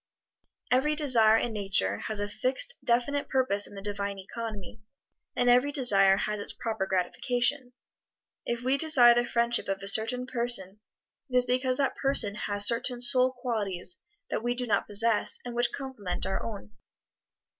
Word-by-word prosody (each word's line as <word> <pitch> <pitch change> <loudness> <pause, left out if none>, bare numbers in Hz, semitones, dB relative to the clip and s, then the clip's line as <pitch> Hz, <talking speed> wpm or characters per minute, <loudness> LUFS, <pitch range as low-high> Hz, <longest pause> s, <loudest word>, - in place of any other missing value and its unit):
Every 285 +4 +1
desire 235 -7 +5
in 235 0 -3
Nature 190 - -2
has 215 -1 -3
a 205 - -2
fixed, 260 - 0
definite 245 +4 -1
purpose 255 -7 +1
in - - -14
the 195 - -9
Divine 200 -1 -5
Economy, 215 +1 -8 0.5
and 245 - 0
every 250 +4 +3
desire 195 -9 +5
has 210 0 -3
its 205 - 0
proper 220 -4 -4
gratification. 245 +8 -1 0.7
If 240 0 -4
we 260 +2 0
desire 265 -7 +5
the 240 0 -1
friendship 235 0 +1
of 195 0 -4
a - - -4
certain 225 +5 +3
person, 235 -6 -1 0.5
it 250 - 0
is 250 - +3
because 255 +1 -1
that 275 -2 -1
person 270 -7 +2
has 205 -1 0
certain 240 +2 0
soul 255 +1 +3
qualities 230 - -5 0.3
that - - -2
we 240 +1 -2
do 250 0 -3
not 225 - -1
possess, 215 +1 +2
and 245 - -7
which 240 0 0
complement 215 -10 -5
our 195 - -3
own. 200 - -8
235 Hz, 165 wpm, -27 LUFS, 205-255 Hz, 0.7 s, desire